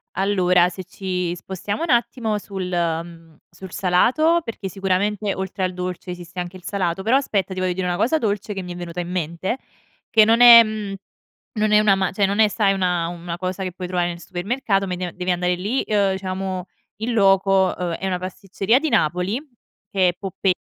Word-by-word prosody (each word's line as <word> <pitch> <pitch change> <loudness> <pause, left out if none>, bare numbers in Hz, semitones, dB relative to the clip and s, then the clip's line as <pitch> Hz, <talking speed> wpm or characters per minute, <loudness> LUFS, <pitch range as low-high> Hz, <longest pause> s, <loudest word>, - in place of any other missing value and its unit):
Allora, 180 -2 +3
se 185 +1 -8
ci 180 -1 -3
spostiamo 190 - -4
un 335 - -3
attimo 235 -3 +1
sul 195 -3 -5
ehm, 165 -2 -3
sul 180 +1 -11
salato 255 - +3
perché, 220 -4 -6
sicuramente 195 +2 -1
oltre 190 0 -4
al 185 0 -1
dolce 180 0 -5
esiste 175 0 -10
anche 175 +1 -7
il 180 - -18
salato, 180 -1 -2
però 225 +6 +2
aspetta 200 -9 0
ti 185 - -4
voglio 185 - +1
dire 180 0 -2
una 175 - 0
cosa 240 - +2
dolce 210 -3 -2
che 195 - -4
mi 180 -1 -7
è - - -9
venuta 175 0 -6
in 175 - -4
mente, 180 +5 -2 0.5
che 215 -1 +6
non 230 +2 +4
è 235 -1 +11
mhmm, 215 -2 -4 0.6
non 215 -1 +1
è 210 - +6
una 205 -2 +4
ma 190 -1 0
cioè 200 +1 +1
non 200 +2 -2
è 220 - +6
sai 205 -1 +2
una 180 -3 0
una 170 0 -6
cosa 185 +1 -3
che 185 - -4
puoi 180 0 -6
trovare 175 -1 0
nel 170 0 -8
supermercato 195 +3 -1
ma 180 - -3
de 180 -1 -4
devi 180 0 -1
andare 180 0 0
lì, 210 +9 -1
ehm, 200 -3 +1
diciamo 190 -1 -4 0.4
in 235 +2 -1
loco: 195 -2 +3
ehm, 175 -2 -2
è 190 - -4
una 180 -1 -1
pasticceria 195 +5 0
di 310 +2 -2
Napoli, 195 - +1 0.5
che 185 -2 +3
è - - -9
Poppella 190 0 -1
190 Hz, 205 wpm, -22 LUFS, 180-205 Hz, 0.6 s, è